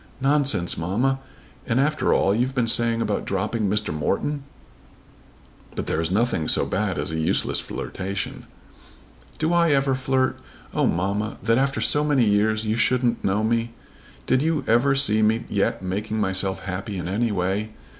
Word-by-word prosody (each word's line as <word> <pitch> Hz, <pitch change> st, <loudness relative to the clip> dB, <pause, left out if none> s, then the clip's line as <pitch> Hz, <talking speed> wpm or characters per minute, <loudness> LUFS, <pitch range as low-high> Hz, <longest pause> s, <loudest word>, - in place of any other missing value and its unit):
"Nonsense, 135 Hz, -, +2 dB
mamma! 120 Hz, +11 st, 0 dB, 0.5 s
And 120 Hz, +1 st, +1 dB
after 150 Hz, +2 st, +1 dB
all 95 Hz, -, +3 dB
you've 125 Hz, +5 st, 0 dB
been 125 Hz, -3 st, +2 dB
saying 115 Hz, 0 st, +2 dB
about 105 Hz, -, -1 dB
dropping 105 Hz, +2 st, -1 dB
Mr. 105 Hz, -4 st, 0 dB
Morton!" 135 Hz, -, -1 dB, 1.3 s
"But -, -, -3 dB
there 80 Hz, -, -1 dB
is 80 Hz, -, -1 dB
nothing 100 Hz, -5 st, 0 dB
so -, -, +3 dB
bad 95 Hz, -1 st, -1 dB
as -, -, -3 dB
a 80 Hz, -, -2 dB
useless 80 Hz, -, +1 dB
flirtation." 95 Hz, +1 st, -5 dB, 0.9 s
"Do 160 Hz, +2 st, 0 dB
I 170 Hz, -3 st, +4 dB
ever 135 Hz, -1 st, +2 dB
flirt? 130 Hz, 0 st, 0 dB, 0.3 s
Oh, -, -, +2 dB
mamma, 100 Hz, +5 st, -1 dB
that 115 Hz, +2 st, +3 dB
after 135 Hz, +1 st, 0 dB
so 145 Hz, -, +3 dB
many 145 Hz, -5 st, +3 dB
years 110 Hz, +1 st, +2 dB
you 110 Hz, +1 st, 0 dB
shouldn't 125 Hz, +1 st, +1 dB
know 100 Hz, +2 st, +1 dB
me! 115 Hz, +1 st, 0 dB, 0.5 s
Did 130 Hz, 0 st, +2 dB
you 155 Hz, 0 st, 0 dB
ever 125 Hz, +5 st, +3 dB
see 110 Hz, -6 st, +2 dB
me 110 Hz, +2 st, +2 dB
yet 100 Hz, -1 st, -1 dB
making 105 Hz, +4 st, -3 dB
myself 95 Hz, -1 st, 0 dB
happy 95 Hz, +2 st, -5 dB
in 90 Hz, -, -4 dB
any 110 Hz, +5 st, 0 dB
way? 100 Hz, +3 st, -1 dB
110 Hz, 165 wpm, -23 LUFS, 100-130 Hz, 1.3 s, I